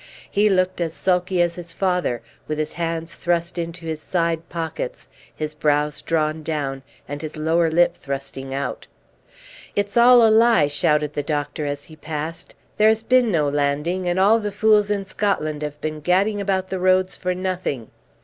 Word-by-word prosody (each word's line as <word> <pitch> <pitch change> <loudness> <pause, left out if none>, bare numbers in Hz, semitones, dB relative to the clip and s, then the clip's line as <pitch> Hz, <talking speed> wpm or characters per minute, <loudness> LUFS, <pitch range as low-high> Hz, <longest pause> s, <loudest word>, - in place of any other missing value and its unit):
He 210 +1 +3
looked 185 -2 +1
as 165 -1 -2
sulky 180 -1 +1
as 170 -1 -1
his 170 -1 -7
father, 180 -12 0 0.2
with 155 - -2
his 155 0 -2
hands 165 0 -3
thrust 170 0 -1
into 170 0 -5
his 160 -1 -4
side 165 -2 -1
pockets, 175 - -5 0.3
his 155 0 -4
brows 150 -1 0
drawn 155 -1 0
down, 145 -4 -3 0.3
and 145 +1 -5
his 155 -1 -6
lower 165 +2 +2
lip 175 +2 +3
thrusting 135 -1 -6
out. 140 +1 -4 0.9
"It's 205 0 -1
all 240 0 +8
a - - +4
lie!" 225 -7 +5
shouted 150 0 +1
the 145 - -1
doctor 145 +1 -2
as 145 0 -4
he 160 - -13
passed. 160 +2 -6 0.2
"There 215 +1 +6
has 220 0 +1
been 250 -1 +3
no 155 -5 +2
landing, 150 +6 0
and 175 +1 0
all 210 +4 +5
the 210 -1 -3
fools 210 0 +3
in 200 -1 -1
Scotland 155 -7 -1
have 150 0 -5
been 155 0 -3
gadding 195 +6 +1
about 190 -1 -1
the 190 - -3
roads 185 0 +2
for 180 0 -2
nothing." 180 - -3
170 Hz, 180 wpm, -22 LUFS, 150-190 Hz, 0.9 s, all